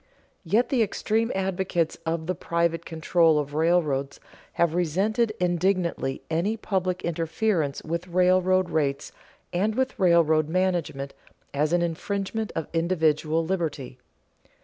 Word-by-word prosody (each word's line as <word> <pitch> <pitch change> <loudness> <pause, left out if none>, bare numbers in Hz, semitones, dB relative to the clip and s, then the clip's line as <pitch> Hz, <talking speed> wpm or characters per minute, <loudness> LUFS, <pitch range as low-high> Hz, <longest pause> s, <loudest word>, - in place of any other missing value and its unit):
Yet 215 +8 +2
the 255 -4 +2
extreme 225 +2 0
advocates 190 -3 -1
of 165 0 -1
the 185 - -1
private 170 -1 -1
control 165 0 +2
of 145 -1 -2
railroads 155 -4 +1 0.3
have 170 -2 +1
resented 195 +7 +1
indignantly 175 -5 0
any 175 +8 0
public 185 -4 -2
interference 165 -2 -1
with 170 +3 -3
railroad 185 +1 +3
rates 140 -3 -1 0.4
and 205 +5 0
with 260 -2 -1
railroad 160 -4 +4
management 165 -6 -1 0.4
as 150 +2 +1
an 175 0 +2
infringement 200 +5 -3
of 165 - -3
individual 160 -2 +1
liberty. 155 -8 -3
170 Hz, 120 wpm, -25 LUFS, 160-190 Hz, 0.4 s, railroad